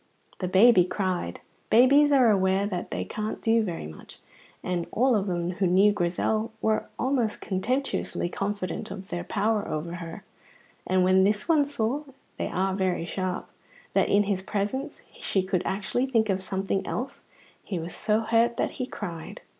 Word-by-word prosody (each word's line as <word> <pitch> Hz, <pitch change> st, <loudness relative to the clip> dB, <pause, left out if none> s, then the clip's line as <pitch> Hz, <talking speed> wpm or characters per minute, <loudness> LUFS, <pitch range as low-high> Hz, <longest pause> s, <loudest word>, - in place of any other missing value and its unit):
The 185 Hz, -, -1 dB
baby 190 Hz, +1 st, +6 dB
cried. 180 Hz, -, -2 dB, 0.3 s
Babies 280 Hz, +5 st, +6 dB
are 255 Hz, -5 st, +6 dB
aware 190 Hz, 0 st, +2 dB
that 185 Hz, -4 st, -4 dB
they -, -, -3 dB
can't 215 Hz, 0 st, -4 dB
do 225 Hz, 0 st, +3 dB
very 175 Hz, -, -4 dB
much; 80 Hz, 0 st, -11 dB, 0.5 s
but 175 Hz, -2 st, -2 dB
all 255 Hz, +1 st, +3 dB
of 205 Hz, -1 st, 0 dB
them 175 Hz, -1 st, -1 dB
who 185 Hz, +1 st, 0 dB
knew 190 Hz, +4 st, +5 dB
Grizel 205 Hz, +4 st, 0 dB
were 220 Hz, 0 st, 0 dB
almost 250 Hz, -4 st, 0 dB
contemptuously 245 Hz, +1 st, -2 dB
confident 200 Hz, +2 st, -3 dB
of 195 Hz, 0 st, -8 dB
their 175 Hz, -2 st, -3 dB
power 215 Hz, +3 st, 0 dB
over 170 Hz, +3 st, -4 dB
her, 165 Hz, -1 st, -8 dB, 0.6 s
and 185 Hz, 0 st, +3 dB
when 185 Hz, +1 st, +5 dB
this 210 Hz, +1 st, +1 dB
one 310 Hz, -4 st, +4 dB
saw 275 Hz, 0 st, -1 dB, 0.4 s
(they -, -, -2 dB
are 190 Hz, +1 st, 0 dB
very 185 Hz, -3 st, 0 dB
sharp) 185 Hz, 0 st, -3 dB, 0.5 s
that -, -, +2 dB
in 205 Hz, +1 st, +4 dB
his 195 Hz, -2 st, -1 dB
presence 215 Hz, +10 st, -3 dB, 0.2 s
she 190 Hz, -, 0 dB
could 185 Hz, -1 st, 0 dB
actually 210 Hz, +6 st, -1 dB
think 225 Hz, -4 st, +2 dB
of 190 Hz, -1 st, +1 dB
something 195 Hz, +1 st, -2 dB
else, 255 Hz, +3 st, -4 dB, 0.4 s
he 190 Hz, -, -4 dB
was 165 Hz, +1 st, -5 dB
so 215 Hz, +1 st, +1 dB
hurt 230 Hz, +1 st, +2 dB
that -, -, 0 dB
he 250 Hz, -, -2 dB
cried. 170 Hz, -9 st, -7 dB
200 Hz, 170 wpm, -26 LUFS, 185-225 Hz, 0.6 s, baby